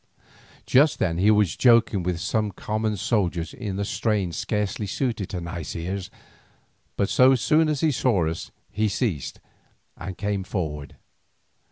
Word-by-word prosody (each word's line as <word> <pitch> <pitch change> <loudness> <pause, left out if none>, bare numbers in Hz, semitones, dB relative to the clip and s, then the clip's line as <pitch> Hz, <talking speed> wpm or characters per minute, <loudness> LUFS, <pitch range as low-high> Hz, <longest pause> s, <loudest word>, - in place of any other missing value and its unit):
Just 145 +4 +4
then 85 -1 0
he 100 +3 +4
was 105 -6 +3
joking 115 -5 +4
with 90 -1 -2
some 105 +3 -1
common 110 +2 -2
soldiers 90 -6 -1
in 105 -6 -5
a 100 - -1
strain 105 -4 0
scarcely 105 +4 -2
suited 115 -2 -2
to 90 - -4
nice 85 -4 -6
ears, 90 +2 -4 0.9
but 100 - +2
so 130 +5 +5
soon 155 +5 +3
as 150 -3 -1
he 160 - +3
saw 115 - +1
us 80 +1 -4 0.2
he 110 0 0
ceased 100 - -2 0.6
and 90 +1 -7
came 100 -1 -2
forward. 75 -7 -4
100 Hz, 150 wpm, -24 LUFS, 90-110 Hz, 0.9 s, so